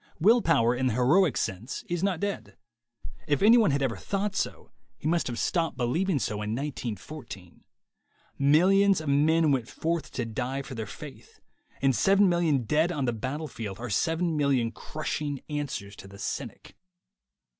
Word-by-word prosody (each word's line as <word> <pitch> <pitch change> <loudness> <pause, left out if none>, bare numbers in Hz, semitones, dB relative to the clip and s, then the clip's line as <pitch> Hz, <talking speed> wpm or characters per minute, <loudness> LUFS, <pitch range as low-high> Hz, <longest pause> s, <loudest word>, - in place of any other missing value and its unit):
Will 225 +8 +5
power 120 - +3
in 130 +1 0
the 125 - +1
heroic 145 +7 +3
sense 100 +7 -3
is 175 -1 -2
not 190 -4 0
dead. 195 - -4 0.7
If 145 +2 +1
any 225 +3 +8
one 220 - +4
had 140 -1 +1
ever 120 -4 0
thought 195 - -3
so, - - -3 0.3
he - - -4
must 170 +1 +1
have 120 -2 -4
stopped 165 -2 0
believing 155 +9 0
so 105 -5 -2
in 105 +1 -2
1914. 120 - -7 0.8
Millions 185 +7 +4
of 155 -2 -4
men 155 +2 +3
went 130 -4 0
forth 165 0 -2
to 125 - -2
die 125 +4 -3
for 135 - -9
their 110 -3 -5
faith, - - -11 0.4
and 135 -2 +3
seven 195 - +4
million 170 -7 +2
dead 155 +9 +1
on 145 -6 -1
the 120 - 0
battlefield 120 -4 -5
are 120 0 -6
seven 165 - 0
million 135 -6 +1
crushing 150 0 -4
answers 135 -9 -4
to - - -11
the 100 0 -13
cynic. 100 - -6
145 Hz, 165 wpm, -27 LUFS, 120-170 Hz, 0.8 s, any